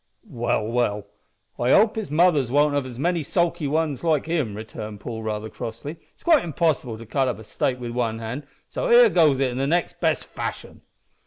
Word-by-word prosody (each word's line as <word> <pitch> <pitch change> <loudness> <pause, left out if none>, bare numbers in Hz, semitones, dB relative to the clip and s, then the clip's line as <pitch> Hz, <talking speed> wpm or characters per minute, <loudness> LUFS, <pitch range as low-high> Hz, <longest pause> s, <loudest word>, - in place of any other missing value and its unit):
"Well, 120 - -1
well, 110 -3 0 0.5
I 120 +2 +3
hope 215 0 +5
his 220 -3 -3
after 150 - -5
mothers 155 -7 +4
won't 145 +2 +3
have 130 -4 -2
many 170 +4 0
sulky 170 0 0
ones 155 -1 -1
like 155 -4 +2
him," 155 -11 -1
returned 110 -1 -7
Paul, 110 +2 -6
rather 110 0 -3
crossly. 115 +9 -7 0.2
"It's - - -28
quite 325 -4 +5
impossible 155 -7 0
to 115 - -10
cut 135 +4 0
up 120 -5 -2
a 110 - -11
steak 125 +4 -1
wi' 120 -1 -5
one 115 -2 -1
hand, 115 +6 -6 0.2
so - - -3
here 485 0 +8
goes 150 -6 +4
i' 130 -2 +1
the 135 +2 -1
next 170 +3 0
best - - +1
fashion." - - -6
135 Hz, 195 wpm, -24 LUFS, 115-165 Hz, 0.5 s, here